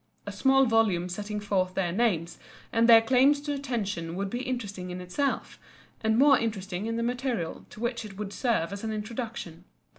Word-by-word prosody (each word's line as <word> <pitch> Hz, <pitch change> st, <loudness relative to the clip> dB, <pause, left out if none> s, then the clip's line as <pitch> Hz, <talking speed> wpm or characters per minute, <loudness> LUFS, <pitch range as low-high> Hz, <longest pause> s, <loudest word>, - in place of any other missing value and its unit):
A 205 Hz, -, -4 dB
small 265 Hz, +6 st, +4 dB
volume 215 Hz, -7 st, +2 dB
setting 210 Hz, +3 st, -4 dB
forth 190 Hz, -3 st, -1 dB
their 180 Hz, -3 st, 0 dB
names 180 Hz, -5 st, 0 dB, 0.3 s
and 230 Hz, 0 st, +3 dB
their 225 Hz, -1 st, +9 dB
claims 265 Hz, +4 st, +4 dB
to 290 Hz, 0 st, -3 dB
attention 210 Hz, -12 st, -3 dB
would 195 Hz, +1 st, -3 dB
be 245 Hz, -, -2 dB
interesting 205 Hz, -8 st, -4 dB
in 180 Hz, 0 st, -5 dB
itself, 225 Hz, +11 st, -2 dB, 0.4 s
and 220 Hz, 0 st, +2 dB
more 275 Hz, 0 st, +6 dB
interesting 200 Hz, -3 st, -3 dB
in 230 Hz, -, -2 dB
the 230 Hz, -, -1 dB
material 245 Hz, -7 st, -2 dB
to -, -, -13 dB
which 235 Hz, 0 st, -2 dB
it 200 Hz, -3 st, -10 dB
would 205 Hz, -1 st, -5 dB
serve 220 Hz, -9 st, 0 dB
as 200 Hz, -, -7 dB
an 220 Hz, -, -2 dB
introduction. 215 Hz, -5 st, -5 dB
220 Hz, 185 wpm, -28 LUFS, 190-240 Hz, 0.4 s, their